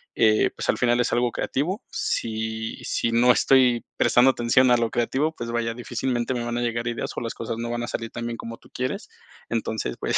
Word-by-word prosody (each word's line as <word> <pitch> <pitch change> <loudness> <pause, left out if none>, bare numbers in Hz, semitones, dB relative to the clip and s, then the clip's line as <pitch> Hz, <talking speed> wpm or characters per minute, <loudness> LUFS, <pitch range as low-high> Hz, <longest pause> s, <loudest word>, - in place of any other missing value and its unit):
eh, 110 -1 +4
pues, - - -5
al - - +3
final 120 0 +3
es 125 - +1
algo 120 0 +2
creativo. 180 - -2
Si 110 0 -2
si 115 - 0
no 120 +2 +5
estoy 125 -2 +4
prestando 125 +2 +5
atención 125 +1 +3
a 120 - +6
lo 115 -1 0
creativo, 135 +6 0
pues, 115 0 -5
vaya, 115 -1 -1
difícilmente 120 +1 -2
me 120 - -2
van 120 0 -2
a - - -1
llegar 115 0 -1
ideas, 120 - -2
o - - -3
las 115 - -3
cosas 115 0 -4
no 115 0 -3
van 120 0 -2
a - - -3
salir 115 0 -4
tan 120 0 -4
bien 115 -1 -4
como 115 0 -7
tú - - -20
quieres. 165 - -3 0.4
Entonces, - - -2
pues, - - +1
120 Hz, 225 wpm, -24 LUFS, 115-125 Hz, 0.4 s, a